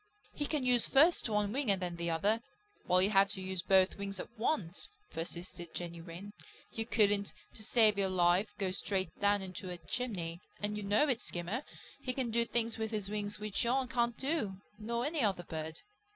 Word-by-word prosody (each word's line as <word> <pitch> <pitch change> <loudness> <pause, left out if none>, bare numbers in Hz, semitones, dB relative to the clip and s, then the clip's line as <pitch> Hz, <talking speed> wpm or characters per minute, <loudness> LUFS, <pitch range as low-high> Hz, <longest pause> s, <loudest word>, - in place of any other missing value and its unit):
"He 290 - -2
can 295 -5 -1
use 245 -2 +5
first 300 -1 +5
one 210 -1 +1
wing 270 -3 0
and 195 -2 +4
then 175 -2 -3
the 170 0 -2
other, 205 +8 +2 0.5
while 185 +1 +5
you 200 - +2
have 195 -1 +5
to 195 - -4
use 190 -1 -2
both 190 +1 +3
wings 195 -1 -4
at - - -6
once," 215 - -1 0.2
persisted 170 +1 -5
Jenny 170 -1 -5
Wren. 180 +4 -9 0.4
"You 225 0 -3
couldn't, 205 -3 +2 0.2
to - - -5
save 215 -2 +4
your 195 -1 +2
life, 185 +3 +2
go 190 -2 -1
straight 190 -2 -1
down 205 -1 +3
into 185 0 -6
a 180 - -4
chimney, 175 -1 -3 0.2
and 210 0 -2
you 210 - -3
know 205 +9 +3
it, 250 -4 +1
Skimmer. 180 - -3 0.4
He 255 - -3
can 250 -3 -1
do 235 +1 +2
things 230 -1 +1
with 220 0 -1
his 210 -3 -3
wings 205 -1 -3
which 210 -1 -1
you 255 +2 +1
can't 235 -1 +1
do, 270 -9 -1 0.2
nor 235 +3 -2
any 305 0 0
other 195 -5 +1
bird." 160 -1 -5
205 Hz, 200 wpm, -33 LUFS, 185-235 Hz, 0.5 s, use